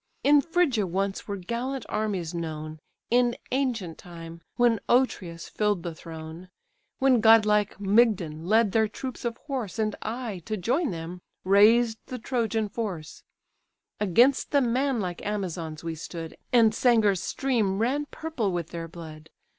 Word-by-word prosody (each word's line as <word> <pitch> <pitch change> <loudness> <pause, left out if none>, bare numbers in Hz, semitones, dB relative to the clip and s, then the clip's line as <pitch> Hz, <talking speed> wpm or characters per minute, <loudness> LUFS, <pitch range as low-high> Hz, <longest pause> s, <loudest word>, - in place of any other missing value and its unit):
In 290 +1 +6
Phrygia 290 - +1
once 195 +2 -2
were 200 -1 -3
gallant 240 +7 -4
armies 200 -6 -2
known, 155 -2 -5 0.3
In 240 0 +3
ancient 240 -11 -1
time, 165 -1 -10
when 240 -2 +3
Otreus 185 -10 +1
fill'd 205 -5 0
the 170 - -4
throne, 160 +2 -9 0.5
When 265 -3 +4
godlike 210 -2 +4
Mygdon 195 -7 +2
led 220 0 +4
their 220 +1 +3
troops 255 +4 -7
of 230 -1 -2
horse, 255 -9 -4
And 215 -2 0
I, 225 -3 -4
to 215 -1 -2
join 260 - 0
them, 170 0 -6 0.2
raised 220 +4 +5
the 255 - -5
Trojan 225 -3 -1
force: 195 -8 -5 0.8
Against 235 +8 +3
the 285 - +3
manlike 240 -7 -1
Amazons 170 -7 -4
we 165 -1 -3
stood, 165 +1 -7 0.2
And 230 -3 +5
Sangar's 220 -6 +3
stream 225 -8 0
ran 270 +7 0
purple 280 -13 -3
with 175 -2 -3
their 165 -1 -5
blood. 160 -2 -11
210 Hz, 140 wpm, -26 LUFS, 175-240 Hz, 0.8 s, In